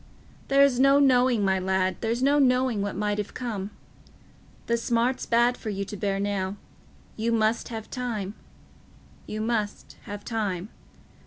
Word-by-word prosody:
"There's 275 -2 +4
no 275 +1 +6
knowing, 250 -5 +4
my 190 0 +2
lad—there's 190 +6 0
no 285 +2 +4
knowing 250 -4 +2
what 200 0 -3
might 210 +1 -1
have 205 - -5
come. 210 -6 -4 1.0
The 235 - +1
smart's 235 +2 0
bad 240 +1 +3
for 220 - -6
you 200 -1 -3
to 205 - -7
bear 195 -1 -1
now: 200 -1 -1 0.6
you 225 +1 0
must 225 0 +1
have 225 -2 -6
time—you 215 -2 -8
must 220 -2 -3
have 205 0 -7
time. 205 -4 -2
220 Hz, 140 wpm, -26 LUFS, 200-245 Hz, 1.0 s, no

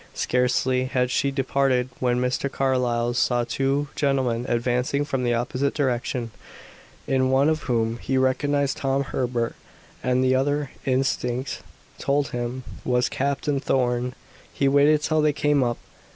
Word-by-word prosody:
Scarcely 125 +1 +1
had 125 -1 0
she 140 +2 +1
departed 135 -2 +1
when 125 -1 +1
Mr. 125 +2 -1
Carlyle 125 -3 0
saw 120 0 +2
two 135 +4 0
gentlemen 130 -4 0
advancing 125 +4 0
from 135 -3 -2
the 120 -1 +1
opposite 125 +4 -1
direction, 125 -3 -1 0.7
in 130 -1 +1
one 135 +2 +3
of 155 -1 0
whom 115 -1 0
he 130 - -1
recognized 140 +2 +1
Tom 135 0 0
Herbert, 125 -3 -2 0.5
and 125 0 +1
the 130 0 +3
other 145 +1 0 0.2
instinct 130 -1 -1 0.4
told 140 0 0
him 120 +1 -4 0.2
was 125 -1 +1
Captain 140 +1 -1
Thorn. 125 -2 0 0.4
He 140 - 0
waited 145 +2 +4
till 155 0 +2
they 150 -1 +3
came 145 -1 +2
up. 120 -1 -1
130 Hz, 140 wpm, -24 LUFS, 125-140 Hz, 0.7 s, waited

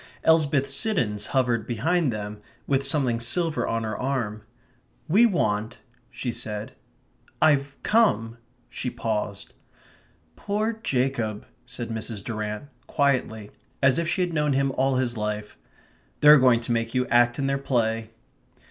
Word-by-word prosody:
Elsbeth 155 -4 +3
Siddons 135 - 0
hovered 120 -4 0
behind 145 +6 +1
them 105 -1 -6 0.2
with 135 -1 +1
something 135 -4 +2
silver 160 +7 -1
on 115 0 -1
her 110 -1 -3
arm. 120 -5 -2 0.7
"We 210 +9 +5
want," 110 - -1 0.3
she 125 - -4
said.... 105 -1 -5 0.7
"I've 140 -2 +2
come 120 - +2
..." - - -41
she 125 - -4
paused. 105 -4 -4 0.8
"Poor 215 +3 -1
Jacob," 125 - -1 0.2
said 125 -2 -6
Mrs. 110 -2 -4
Durrant, 110 +3 -5 0.2
quietly, 125 -7 0 0.3
as 135 +2 +4
if 170 - -1
she 185 - 0
had 175 -1 -1
known 150 -2 +1
him 135 0 +1
all 130 0 +1
his 125 -2 -1
life. 105 0 -4 0.7
"They're 150 0 +9
going 125 -2 +4
to 120 - -5
make 115 +1 -1
you 125 0 +2
act 120 0 +4
in 140 - -1
their 135 0 0
play." 115 -4 -1
125 Hz, 140 wpm, -25 LUFS, 110-140 Hz, 0.8 s, They're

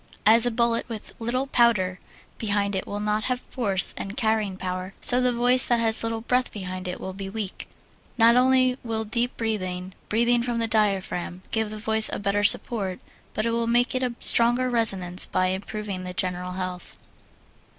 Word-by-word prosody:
As 225 +3 +5
a - - +3
bullet 235 0 0
with 220 -2 -8
little 245 +3 -2
powder 210 -8 +2 0.4
behind 205 -2 -1
it 190 - -4
will 205 - -5
not 210 0 -1
have 250 -1 -1
force 200 -8 +1
and 200 +4 -7
carrying 220 -5 0
power, 185 0 -5
so 250 -2 +4
the 250 0 +2
voice 245 +1 +3
that 240 -1 +2
has 225 -1 +5
little 225 0 -3
breath 250 +2 0
behind 185 -2 -6
it 180 - -5
will 190 - -6
be 195 0 -7
weak. 200 -2 -6 0.5
Not 230 0 +5
only 255 0 +3
will 225 -2 -3
deep 235 +3 -1
breathing 185 -5 -3 0.2
breathing 235 +2 +2
from 240 -1 -2
the 230 - +1
diaphragm 195 -4 -1
give 220 -1 -1
the 215 - -7
voice 220 0 +3
a - - -3
better 205 +1 -1
support, 205 -3 +3 0.4
but 215 - -1
it 230 - 0
will 230 0 -1
give 240 +1 +2
it 255 - -1
a 250 -2 -2
stronger 240 +2 +3
resonance 195 -6 +3
by 185 0 0
improving 195 0 -5
the 180 0 -7
general 180 0 -3
health. 185 -1 -6
220 Hz, 185 wpm, -24 LUFS, 190-235 Hz, 0.5 s, As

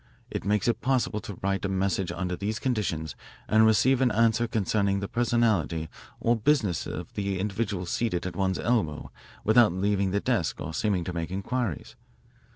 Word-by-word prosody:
It - - -3
makes 105 +3 +1
it 120 - +1
possible 125 -4 +1
to 100 - -8
write 95 0 0
a 100 - -1
message 95 -1 0
under 90 0 -3
these 105 +4 -3
conditions 100 - -2 0.3
and 110 0 +5
receive 125 +5 +4
an 130 - +4
answer 115 +1 +2
concerning 100 -2 +1
the 100 - -3
personality 110 -10 +1 0.3
or 120 +1 +2
business 110 - +1
of - - -6
the 100 -1 -2
individual 100 -1 -2
seated 90 0 -1
at 90 - -4
one's 95 -2 0
elbow 105 -12 -1 0.3
without 110 -3 +5
leaving 100 +1 +1
the 100 +2 +1
desk - - -1
or 80 +2 -5
seeming 95 -1 0
to 90 - -5
make 85 -1 -3
inquiries. 100 - -3
100 Hz, 170 wpm, -27 LUFS, 95-115 Hz, 0.3 s, and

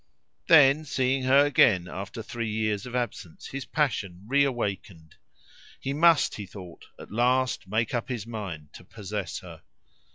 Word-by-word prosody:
Then, 145 -1 +6
seeing 130 -1 0
her 135 +2 +5
again 105 -10 +4
after 100 +5 -7
three 115 0 -4
years 110 0 -2
of 125 - -7
absence 110 -8 -4
his 140 0 -6
passion 100 - -2
reawakened. 115 - -1 0.7
He 135 - -3
must, 165 +1 +4
he 100 -2 -7
thought, 90 -3 -11
at - - -12
last 125 0 +1
make 110 +3 -1
up 120 0 -2
his 120 -5 -4
mind 95 -10 -7
to - - -12
possess 100 -1 -6
her. - - -12
115 Hz, 150 wpm, -26 LUFS, 100-130 Hz, 0.7 s, Then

